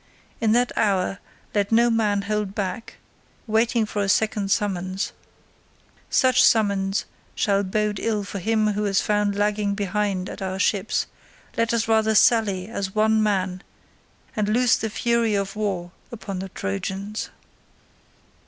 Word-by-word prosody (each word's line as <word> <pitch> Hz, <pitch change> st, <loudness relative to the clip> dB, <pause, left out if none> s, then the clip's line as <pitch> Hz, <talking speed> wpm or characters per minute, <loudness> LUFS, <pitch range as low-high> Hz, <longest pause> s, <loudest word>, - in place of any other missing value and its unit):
In 220 Hz, -1 st, +2 dB
that 245 Hz, +1 st, +2 dB
hour 195 Hz, -2 st, +1 dB, 0.3 s
let 205 Hz, 0 st, 0 dB
no 235 Hz, +1 st, +4 dB
man 210 Hz, -3 st, +1 dB
hold 210 Hz, -1 st, -2 dB
back, 195 Hz, +2 st, -4 dB, 0.5 s
waiting 225 Hz, +1 st, +2 dB
for 210 Hz, -1 st, -3 dB
a 195 Hz, -, 0 dB
second 210 Hz, -1 st, +1 dB
summons; 190 Hz, -2 st, -1 dB, 1.0 s
such 255 Hz, -2 st, +4 dB
summons 200 Hz, -3 st, +2 dB, 0.3 s
shall 200 Hz, -1 st, +2 dB
bode 205 Hz, +1 st, -1 dB
ill 215 Hz, -2 st, -1 dB
for 200 Hz, 0 st, -6 dB
him 215 Hz, +2 st, +1 dB
who 210 Hz, +1 st, -1 dB
is 195 Hz, -1 st, +2 dB
found 205 Hz, -1 st, +1 dB
lagging 205 Hz, 0 st, 0 dB
behind 200 Hz, -2 st, -1 dB
at -, -, -8 dB
our 190 Hz, 0 st, -3 dB
ships; 200 Hz, +1 st, 0 dB, 0.5 s
let 230 Hz, 0 st, +1 dB
us 230 Hz, -1 st, 0 dB
rather 220 Hz, -1 st, +3 dB
sally 205 Hz, -5 st, +3 dB
as 200 Hz, -3 st, -4 dB
one 220 Hz, 0 st, +3 dB
man 190 Hz, -3 st, 0 dB, 0.7 s
and 210 Hz, -2 st, 0 dB
loose 240 Hz, +2 st, +4 dB
the 220 Hz, -, -3 dB
fury 235 Hz, 0 st, +1 dB
of 195 Hz, +1 st, -2 dB
war 190 Hz, -5 st, -2 dB, 0.2 s
upon 200 Hz, -5 st, -6 dB
the 190 Hz, +1 st, -5 dB
Trojans." 190 Hz, -, -4 dB
210 Hz, 145 wpm, -23 LUFS, 195-220 Hz, 1.0 s, no